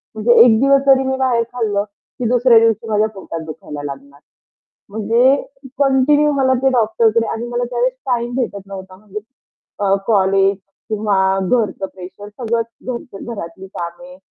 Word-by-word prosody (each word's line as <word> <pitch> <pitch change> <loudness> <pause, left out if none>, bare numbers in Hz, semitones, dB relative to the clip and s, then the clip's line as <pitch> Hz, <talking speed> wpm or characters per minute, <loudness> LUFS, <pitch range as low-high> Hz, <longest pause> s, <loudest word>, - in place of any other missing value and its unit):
म्हणजे 225 +2 +3
एक 225 -3 +5
दिवस 275 +1 +4
जरी 265 0 +5
मी 265 0 -1
बाहेर 250 -3 +1
खाल्लं 210 -4 -1 0.4
की 245 - -2
दुसऱ्या 245 -1 +5
दिवशी 225 0 +1
माझ्या 215 0 +2
पोटात 165 -3 -7
दुखायला 150 -2 -8
लागणार. 140 0 -9 0.7
म्हणजे 230 +6 +3 0.4
कंटिन्यू 285 +2 +3
मला 265 -2 +2
ते 270 - +5
डॉक्टरकडे 225 -1 +2
आणि 230 +2 -4
मला 240 0 -2
त्यावेळेस 245 +1 0
टाईम 240 -1 -1
भेटत 200 -6 -3
नव्हता 190 -1 -9
म्हणजे 210 +1 -8 0.6
अ, 200 -1 +2
कॉलेज 195 -2 +3 0.3
किंवा 210 -2 0 0.2
घरचं 200 0 0
प्रेशर 190 +2 -10
सगळंच 230 +1 -2 0.2
घराच 240 -4 -6
घरातली 190 -4 -7
कामे 265 +12 -7
225 Hz, 145 wpm, -18 LUFS, 195-250 Hz, 0.7 s, एक